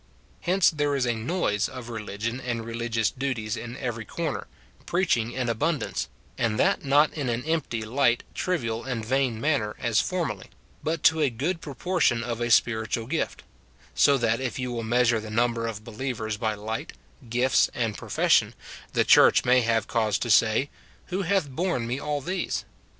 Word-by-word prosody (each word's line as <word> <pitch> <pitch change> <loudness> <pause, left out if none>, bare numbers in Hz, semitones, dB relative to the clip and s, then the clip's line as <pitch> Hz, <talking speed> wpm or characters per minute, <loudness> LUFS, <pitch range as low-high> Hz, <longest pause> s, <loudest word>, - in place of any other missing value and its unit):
Hence 185 +1 +3
there 145 -2 0
is 135 -2 +1
a 120 - +1
noise 110 - -1
of 130 -3 -8
religion 115 +2 -4
and 120 -2 -3
religious 115 -1 -1
duties 125 -5 -2
in 120 +2 -7
every 120 -4 -3
corner, 160 +6 -4 0.4
preaching 125 -11 +1
in 125 0 -2
abundance, 130 +4 -1
— - - -32
and 115 -2 +1
that - - +2
not 145 +2 +4
in 140 -5 -2
an 120 +2 -2
empty, 155 -8 -1
light, 120 +1 +2
trivial, 115 -11 -2
and 120 -4 -3
vain 130 -2 +1
manner, 125 -7 0
as 115 -2 +2
formerly, 160 - -3 0.3
but 160 0 -2
to 160 0 +5
a 145 - +3
good 155 +9 -2
proportion 145 -4 0
of 120 -1 -4
a 120 - 0
spiritual 110 0 +2
gift, 160 +7 -2 0.3
— - - -29
so 140 -1 +5
that 115 0 +1
if 130 -2 -3
you 125 -1 -3
will 120 -1 -3
mea 120 +2 +2
sure 115 -1 +3
the 110 0 -8
number 115 +1 +1
of 110 -2 -5
believers 115 -2 -4
by 110 0 -1
light, 110 +2 -5 0.4
gifts, 125 +3 +3
and 115 -4 -1
profes - - -1
sion, - - +4 0.4
the - - +3
church - - +6
may 125 0 +5
have 115 -1 +1
cause 110 -4 +1
to 120 - -2
say, 110 +6 +4 0.2
" - - -29
Who 190 - 0
hath 190 -3 +1
borne 140 -2 -1
me 125 +3 -2
all 150 -1 -2
these 185 +7 -2
120 Hz, 185 wpm, -26 LUFS, 115-140 Hz, 0.4 s, church